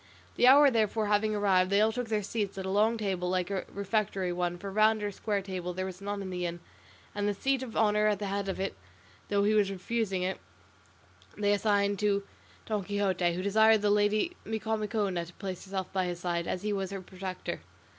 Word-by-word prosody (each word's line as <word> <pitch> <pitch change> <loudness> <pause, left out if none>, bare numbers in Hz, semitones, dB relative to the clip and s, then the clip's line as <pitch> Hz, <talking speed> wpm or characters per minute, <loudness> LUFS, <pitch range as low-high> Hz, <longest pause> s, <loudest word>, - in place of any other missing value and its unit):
The 245 - +4
hour 280 +1 +8
therefore 220 -1 +1
having 210 +1 +2
arrived 190 -3 +3
they 200 +1 +3
all 215 +1 +4
took 245 +1 -3
their 215 -2 0
seats 205 -1 -3
at 190 - -4
a 190 - -2
long 215 +3 +3
table 190 -4 -2
like 180 +1 -1
a 195 -2 -2
refectory 200 -2 -1
one, 175 0 -1
for 195 +2 -6
round 215 +1 +3
or 205 - -1
square 200 0 -2
table 180 -2 -4
there 185 0 -2
was 185 0 -7
none 200 0 -3
in 190 - -6
the 180 -1 -3
inn, 175 0 -3 0.5
and 205 0 -1
the 205 - 0
seat 270 +5 0
of 250 -4 -6
honour 210 -1 +3
at 210 -1 +2
the 205 - -4
head 200 0 -2
of 190 - -3
it, 190 - -2 0.5
though 200 0 +2
he 210 +1 +3
was 210 -2 +4
for 195 - -4
refusing 195 -1 -2
it, 190 +1 -2 1.0
they 205 0 +2
assigned 205 -1 +1
to 200 -1 +1 0.4
Don 210 -3 -1
Quixote, 190 -3 0
who 180 +2 -3
desired 220 +1 +4
the 205 - +3
lady 210 +11 +2
Micomicona 215 -4 -1
to 175 - -13
place 190 -1 -6
herself 190 -1 -4
by 190 -1 +1
his 175 -1 -4
side, 170 -1 -2
as 185 - -3
he 210 0 0
was 195 -2 -2
her 195 -1 -5
protector. 185 0 -6
200 Hz, 220 wpm, -30 LUFS, 185-215 Hz, 1.0 s, hour